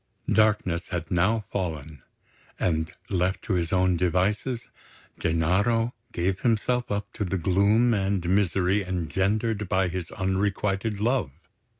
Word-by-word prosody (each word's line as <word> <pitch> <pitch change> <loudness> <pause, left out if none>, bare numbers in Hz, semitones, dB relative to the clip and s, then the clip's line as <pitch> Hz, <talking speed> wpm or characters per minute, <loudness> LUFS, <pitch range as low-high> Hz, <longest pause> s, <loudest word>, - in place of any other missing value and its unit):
Darkness 105 -6 +2
had 85 -3 -4
now 100 +6 +2
fallen; 80 -6 -4 0.6
and, 80 -2 0 0.2
left 95 0 0
to 110 - -1
his 85 -3 0
own 95 -1 +3
devices, 100 +8 0 0.5
Gennaro 95 +9 +1 0.2
gave 95 +2 -1
himself 120 +1 +1
up 100 0 -3
to - - -3
the 95 0 -1
gloom 100 +7 +3
and 95 -3 0
misery 95 +1 +2
engendered 95 +5 -1
by 95 -2 +2
his 90 -1 -4
unrequited 100 +2 -1
love. 115 - +1
95 Hz, 120 wpm, -26 LUFS, 90-105 Hz, 0.6 s, own